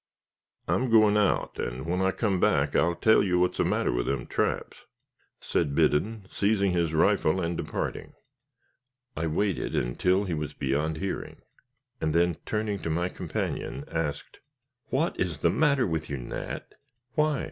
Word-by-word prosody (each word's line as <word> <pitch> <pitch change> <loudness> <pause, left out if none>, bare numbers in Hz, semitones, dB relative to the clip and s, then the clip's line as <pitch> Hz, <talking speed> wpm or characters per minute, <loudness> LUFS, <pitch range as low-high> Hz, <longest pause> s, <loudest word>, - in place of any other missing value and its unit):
"I'm 130 0 +1
goin' 110 -2 +5
out, 105 -2 +1
and 60 +4 -3
when 90 +2 -1
I 95 - +3
come 95 -1 0
back 70 -3 +2
I'll 85 0 +3
tell 110 +4 +4
you 90 -3 +1
what's 90 0 +1
the - - +4
matter - - +1
with - - -1
them 70 -3 -1
traps," - - -2 0.5
said 75 -4 -1
Biddon, 90 +7 +1
seizing 100 -1 +2
his 85 -2 +1
rifle 95 0 +3
and 85 -1 -1
departing. - - -4 1.0
I 80 - -1
waited 95 +3 -1
until 90 +11 +1
he 90 -4 -3
was 75 -1 -4
beyond 75 +4 -1
hearing, 95 +3 -5 0.6
and 80 0 0
then 85 -1 +3
turning 105 -2 -1
to 80 - -4
my 85 +3 0
companion, 70 - -4
asked, - - -3 0.5
"What - - 0
is - - -1
the - - +4
matter 140 -4 +3
with 80 -3 -2
you, 70 - -2
Nat?" - - -6 0.4
"Why?" 150 -3 +2
90 Hz, 160 wpm, -27 LUFS, 80-105 Hz, 1.0 s, goin